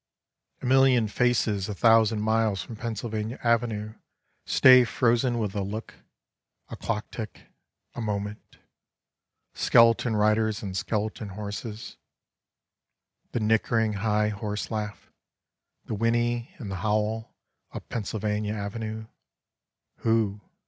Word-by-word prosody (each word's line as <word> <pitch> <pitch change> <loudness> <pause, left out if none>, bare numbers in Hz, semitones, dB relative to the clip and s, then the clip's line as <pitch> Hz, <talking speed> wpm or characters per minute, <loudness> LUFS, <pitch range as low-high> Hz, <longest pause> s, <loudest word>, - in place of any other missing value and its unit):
(A - - -3
million 130 -3 +4
faces 110 -4 +1
a 105 - -3
thousand 110 -1 +4
miles 110 -3 +1
from 115 - -9
Pennsylvania 110 0 -4
Avenue 115 -3 0 0.5
stay 130 -1 +7
frozen 120 0 +1
with 105 -4 -2
a 100 - -2
look, 105 +3 -5 0.8
a - - -6
clocktick, 110 -1 -5 0.5
a - - -5
moment 105 -1 -4 0.5
— - - -57
skeleton 115 0 +5
riders 110 0 +2
on 95 -2 -4
skeleton 105 +2 -2
horses 105 +2 -7 0.7
— - - -53
the - - 0
nickering 110 0 +2
high 105 +1 +1
horse 105 +1 -4
laugh, 105 -2 -5 0.7
the - - -4
whinny 120 +2 0
and 105 -6 -7
the 95 - -3
howl 110 +3 -1 0.4
up - - -8
Pennsylvania 105 -1 -2
Avenue: 110 +1 -5 0.9
who? 110 -3 +1
110 Hz, 115 wpm, -26 LUFS, 105-115 Hz, 0.9 s, stay